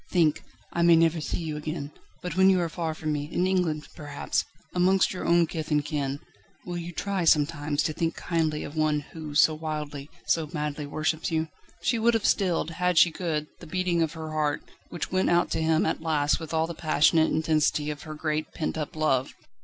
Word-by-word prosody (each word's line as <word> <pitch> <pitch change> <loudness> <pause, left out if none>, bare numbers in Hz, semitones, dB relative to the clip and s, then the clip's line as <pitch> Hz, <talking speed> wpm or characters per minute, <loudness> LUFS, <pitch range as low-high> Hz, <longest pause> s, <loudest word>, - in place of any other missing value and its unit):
"Think! 165 -5 +2 0.3
I 170 - 0
may 170 0 +7
never 165 0 +3
see - - -2
you 155 -2 -3
again; 150 -1 -5 0.3
but 180 -3 -4
when 190 0 +6
you 190 -1 +4
are 170 - -1
far 165 -1 -3
from 155 -1 -3
me 145 0 -3
in 180 - +1
England, 180 -5 0
perhaps 145 -2 -2 0.3
amongst 185 +2 +3
your 185 - -5
own 170 0 +5
kith 160 -1 -5
and 150 -2 +1
kin, 145 -3 -2 0.5
will 175 -1 -4
you 170 +1 -6
try 195 +1 -2
sometimes 150 -2 +2
to 155 - -1
think 165 +1 -1
kindly 160 -3 -1
of 145 - -8
one 155 -1 +1
who 155 -3 -7
so 155 +1 +6
wildly, 150 -2 -5 0.2
so 160 -2 +1
madly 150 -1 -3
worships 155 +4 -1
you?" 160 -1 -1 0.3
She 235 - +1
would 230 +1 +3
have 225 - 0
stilled, 175 -3 +1
an 180 0 +2
she 170 +1 +6
could, 160 -3 -2
the - - -11
beating 180 0 0
of 160 -1 0
her 160 -1 -6
heart, 150 -1 0 0.3
which 175 - -5
went 185 0 +2
out 175 0 +2
to 160 - 0
him 160 0 +2
at 160 - -1
last 150 -3 +1
with 160 -2 -7
all 160 0 +2
the 170 - -5
passionate 160 0 +3
intensity 155 -1 +1
of 150 - -7
her 155 -1 -7
great, 155 0 -2
pent 160 0 -2
up 150 -1 -4
love. 135 -5 +1
160 Hz, 210 wpm, -27 LUFS, 150-170 Hz, 0.5 s, may